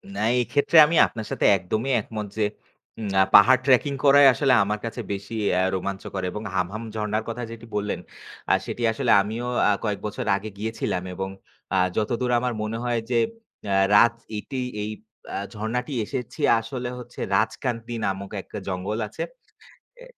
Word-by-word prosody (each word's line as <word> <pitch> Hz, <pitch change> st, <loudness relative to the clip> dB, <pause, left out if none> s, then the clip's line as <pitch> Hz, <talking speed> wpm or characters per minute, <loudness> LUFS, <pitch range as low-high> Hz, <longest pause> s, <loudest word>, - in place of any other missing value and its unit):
না, -, -, -4 dB, 0.2 s
এই 125 Hz, -, +3 dB
ক্ষেত্রে 145 Hz, +3 st, +3 dB
আমি 165 Hz, +3 st, 0 dB
আপনার 110 Hz, -2 st, -7 dB
সাথে -, -, 0 dB
একদমই 110 Hz, +8 st, -2 dB
একমত 105 Hz, 0 st, -6 dB
যে, -, -, 0 dB, 0.8 s
আ -, -, +7 dB
পাহাড় 130 Hz, -1 st, +8 dB
ট্রাকিং 140 Hz, +1 st, +4 dB
করাই 140 Hz, 0 st, +7 dB
আসলে 135 Hz, +2 st, +2 dB
আমার 105 Hz, +1 st, -2 dB
কাছে 115 Hz, +1 st, -4 dB
বেশি 100 Hz, +2 st, -5 dB, 0.3 s
আ -, -, +3 dB
রোমাঞ্চকর 95 Hz, 0 st, -4 dB
এবং 105 Hz, -, -5 dB
হামহাম 95 Hz, +5 st, -2 dB
ঝর্ণার 105 Hz, 0 st, -1 dB
কথা 120 Hz, +1 st, -4 dB
যেটি 115 Hz, 0 st, -9 dB
বললেন 105 Hz, 0 st, -1 dB, 0.5 s
আ -, -, +6 dB
সেটি 120 Hz, -, -4 dB
আসলে 120 Hz, +1 st, 0 dB
আমিও 110 Hz, +4 st, -4 dB, 0.2 s
আ -, -, +5 dB
কয়েক 105 Hz, -3 st, -1 dB
বছর 105 Hz, -, -4 dB
আগে 100 Hz, +2 st, -5 dB
গিয়েছিলাম 105 Hz, -4 st, -2 dB
এবং 95 Hz, +1 st, -4 dB, 0.4 s
আ -, -, +2 dB, 0.2 s
যতদূর 120 Hz, +3 st, 0 dB
আমার 125 Hz, 0 st, -1 dB
মনে 110 Hz, +1 st, -3 dB
হয় 120 Hz, -1 st, +1 dB
যে 125 Hz, -, 0 dB, 0.6 s
আ -, -, +2 dB, 0.2 s
রাত 115 Hz, +3 st, +6 dB, 0.2 s
এটেই 130 Hz, +4 st, -4 dB, 0.2 s
এই 105 Hz, -, -3 dB, 0.4 s
আ -, -, -3 dB, 0.2 s
ঝর্ণাটি 115 Hz, +6 st, -3 dB
এসেছি 125 Hz, +4 st, -6 dB, 0.2 s
আসলে 125 Hz, +2 st, -5 dB
হচ্ছে 120 Hz, 0 st, -11 dB, 0.2 s
রাজকান্তী 120 Hz, -1 st, -1 dB
নামক 100 Hz, 0 st, -3 dB
একটা 105 Hz, -, -10 dB
জঙ্গল 95 Hz, +3 st, -3 dB
আছে 105 Hz, -, -8 dB, 0.8 s
এ। -, -, -10 dB
110 Hz, 165 wpm, -24 LUFS, 105-125 Hz, 0.8 s, পাহাড়